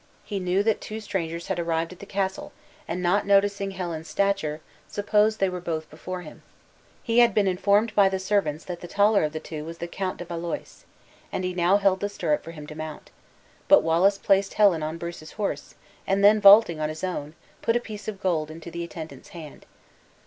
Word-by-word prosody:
He 200 Hz, -2 st, -4 dB
knew 185 Hz, +2 st, +1 dB
that 220 Hz, 0 st, +1 dB
two 215 Hz, +1 st, -6 dB
strangers 170 Hz, -5 st, -4 dB
had 190 Hz, -2 st, -2 dB
arrived 165 Hz, 0 st, -1 dB
at 180 Hz, -, -17 dB
the 200 Hz, -, -10 dB
castle, 200 Hz, +9 st, -3 dB, 0.3 s
and 180 Hz, -, -3 dB
not 190 Hz, +4 st, +2 dB
noticing 200 Hz, 0 st, +3 dB
Helen's 170 Hz, -4 st, -5 dB
stature, 160 Hz, -2 st, 0 dB, 0.3 s
supposed 210 Hz, +1 st, +1 dB
they 195 Hz, -, +3 dB
were 180 Hz, -1 st, -4 dB
both 160 Hz, -2 st, -3 dB
before 180 Hz, +4 st, -6 dB
him. 155 Hz, -, -12 dB, 0.6 s
He 230 Hz, 0 st, +2 dB
had 240 Hz, -1 st, +5 dB
been 210 Hz, -, +3 dB
informed 200 Hz, +4 st, +2 dB
by 200 Hz, -2 st, +5 dB
the 190 Hz, -, -1 dB
servants, 190 Hz, -6 st, -1 dB
that 175 Hz, -2 st, -6 dB
the 175 Hz, -, -7 dB
taller 205 Hz, +1 st, +3 dB
of 150 Hz, -, 0 dB
the 155 Hz, -, -4 dB
two 155 Hz, -1 st, -7 dB
was 165 Hz, +1 st, -8 dB
the 170 Hz, -, -5 dB
Count 185 Hz, +1 st, -4 dB
de 175 Hz, -, -7 dB
Valois, 170 Hz, 0 st, -6 dB, 0.5 s
and 185 Hz, -, -3 dB
he 180 Hz, 0 st, -2 dB
now 180 Hz, +2 st, +3 dB
held 195 Hz, -2 st, +2 dB
the 205 Hz, -, -2 dB
stirrup 165 Hz, -6 st, -1 dB
for -, -, -10 dB
him 155 Hz, -3 st, -9 dB
to 155 Hz, -, -9 dB
mount; 155 Hz, 0 st, -8 dB, 0.6 s
But -, -, +7 dB
Wallace 175 Hz, +5 st, +3 dB
placed 195 Hz, 0 st, +2 dB
Helen 195 Hz, -6 st, +4 dB
on 155 Hz, +2 st, -3 dB
Bruce's 170 Hz, -2 st, -8 dB
horse, 210 Hz, -2 st, -4 dB, 0.3 s
and 195 Hz, +1 st, +1 dB
then 210 Hz, +1 st, +6 dB
vaulting 200 Hz, -5 st, +7 dB
on 155 Hz, 0 st, -1 dB
his 155 Hz, +2 st, -7 dB
own, 160 Hz, -4 st, -4 dB, 0.3 s
put 230 Hz, -, +1 dB
a -, -, +3 dB
piece 215 Hz, -3 st, -9 dB
of 210 Hz, -3 st, -5 dB
gold 160 Hz, -5 st, 0 dB
into 165 Hz, +2 st, -9 dB
the 170 Hz, +1 st, -4 dB
attendant's 160 Hz, -5 st, -9 dB
hand. 155 Hz, -3 st, -11 dB
185 Hz, 210 wpm, -25 LUFS, 165-200 Hz, 0.6 s, But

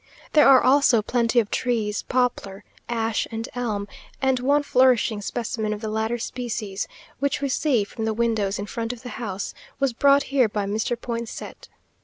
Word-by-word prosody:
There 300 Hz, -, +7 dB
are 265 Hz, -2 st, +7 dB
also 255 Hz, -4 st, +4 dB
plenty 235 Hz, +1 st, +2 dB
of 215 Hz, -3 st, -1 dB
trees; 220 Hz, -4 st, 0 dB
poplar, 240 Hz, -6 st, -1 dB, 0.3 s
ash, 225 Hz, -1 st, 0 dB
and 225 Hz, 0 st, -4 dB
elm; 215 Hz, -5 st, -2 dB, 0.3 s
and 265 Hz, -2 st, +2 dB
one 285 Hz, +3 st, +2 dB
flourishing 250 Hz, -5 st, +3 dB
specimen 220 Hz, 0 st, -2 dB
of 210 Hz, -, -7 dB
the 220 Hz, -2 st, -3 dB
latter 220 Hz, +2 st, -1 dB
species, 225 Hz, -4 st, -4 dB, 0.3 s
which 280 Hz, +1 st, 0 dB
we 280 Hz, -1 st, -1 dB
see 255 Hz, -4 st, +2 dB
from 220 Hz, +2 st, -5 dB
the 220 Hz, -, 0 dB
windows 220 Hz, -4 st, 0 dB
in 200 Hz, -, -4 dB
front 230 Hz, +2 st, -4 dB
of 245 Hz, -, -12 dB
the 250 Hz, -, -6 dB
house, 200 Hz, -3 st, -4 dB, 0.3 s
was 275 Hz, -3 st, +1 dB
brought 280 Hz, +3 st, +4 dB
here 255 Hz, -5 st, +4 dB
by 205 Hz, -1 st, -2 dB
Mr. 220 Hz, +3 st, -1 dB
Poinsett. 235 Hz, -2 st, -6 dB
235 Hz, 175 wpm, -24 LUFS, 215-255 Hz, 0.3 s, There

